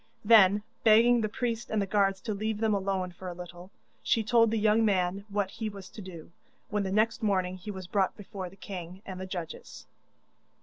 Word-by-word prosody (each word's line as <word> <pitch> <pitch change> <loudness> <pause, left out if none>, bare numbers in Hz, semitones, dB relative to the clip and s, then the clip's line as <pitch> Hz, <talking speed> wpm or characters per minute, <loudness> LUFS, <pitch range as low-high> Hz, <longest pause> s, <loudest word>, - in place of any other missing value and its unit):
Then, 205 -2 +6 0.2
begging 230 +2 +6
the 215 - -1
priest 235 +1 -3
and 220 - 0
the 200 - +1
guards 195 -1 +1
to 220 - -3
leave 215 +1 -2
them 220 0 +1
alone 190 -2 -1
for 180 +1 -10
a 175 - -5
little, 175 +1 -10 0.3
she 225 - +1
told 230 0 +4
the 225 - 0
young 215 +1 +3
man 195 -1 +1
what 200 -1 -1
he 220 -1 -4
was 195 -3 -10
to 215 - -10
do, 170 -4 -10 0.4
when 210 -1 +1
the 190 -1 -2
next 215 +3 +1
morning 185 -4 0
he 185 +3 -9
was 190 -2 -6
brought 190 +1 0
before 195 -3 -7
the 190 - -17
king 185 -1 -8
and 185 -1 -7
the 190 - -5
judges. 175 -4 -7
200 Hz, 210 wpm, -29 LUFS, 185-215 Hz, 0.4 s, Then